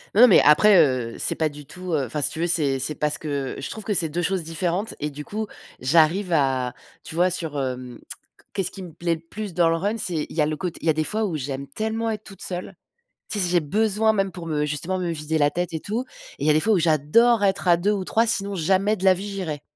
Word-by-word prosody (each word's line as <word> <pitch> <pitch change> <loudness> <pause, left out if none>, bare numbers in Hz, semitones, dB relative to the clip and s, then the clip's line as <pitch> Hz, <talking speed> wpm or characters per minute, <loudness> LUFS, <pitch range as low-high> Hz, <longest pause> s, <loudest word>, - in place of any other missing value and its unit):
Non, 225 - +6
non, 250 - +10
mais 200 - +7
après, 190 +8 +6
heu, 130 -7 +2
c'est - - 0
pas 155 -1 +1
du 145 0 -11
tout, 180 +2 -6
heu 140 -3 +1
enfin 145 +5 -4
si - - +2
tu - - -6
veux, 170 - +1
c'est 145 -6 +1
c'est 150 +4 -2
parce 150 0 0
que 140 -3 -3
je - - -5
trouve 220 - -6
que 210 - -1
c'est 165 -4 +2
2 175 +3 -2
choses 180 0 0
différentes 175 +6 -2
et 150 +1 -3
du 145 +1 -7
coup, 215 +1 -3 0.3
j'arrive 165 +7 +3
à 130 -4 +1 0.3
tu - - -8
vois 180 +2 +3
sur 160 -5 -3
hem 125 -2 -5 0.5
qu'est-ce 195 -3 -1
qui 195 - -9
me 180 - -8
plaît 170 +1 -1
le 160 - -12
plus 200 +3 -7
dans 170 -1 +3
le 165 - +2
run? 200 +7 -1
C'est 175 -8 -2
il - - -10
y 165 - +2
a - - +4
le 155 0 -2
côte 180 -1 -4
il 165 - -4
y - - +5
a 160 - +5
des 155 0 0
fois 215 +6 -1
où 180 -6 -2
j'aime 140 0 -5
tellement 220 +8 -2
être 215 -1 -4
toute 195 -3 -12
seule, 180 0 -5 0.5
tu 210 - -2
sais? 190 - +3
Si 175 - -1
j'ai 175 - +4
besoin 215 +7 +1
même 195 -2 0
pour 175 -3 -8
me 150 -2 0
justement 155 +6 -2
me 180 -2 -2
vider 155 0 -2
la 145 -1 +3
tête 175 +2 -3
et 160 - -3
tout, 230 +5 -3 0.3
et 140 - -4
il - - +1
y - - +5
a - - +6
des 155 - +3
fois 220 +4 +3
où 195 - +3
j'adore 170 - +3
être 195 -1 +1
à 175 - +7
2 180 +5 +1
ou 200 -3 -2
3 225 +4 +2
sinon 200 -3 -1
jamais 190 +5 +2
de 190 - -9
la 190 -1 +6
vie 190 +3 -6
j'irais, 175 -8 -4
170 Hz, 285 wpm, -23 LUFS, 150-195 Hz, 0.5 s, non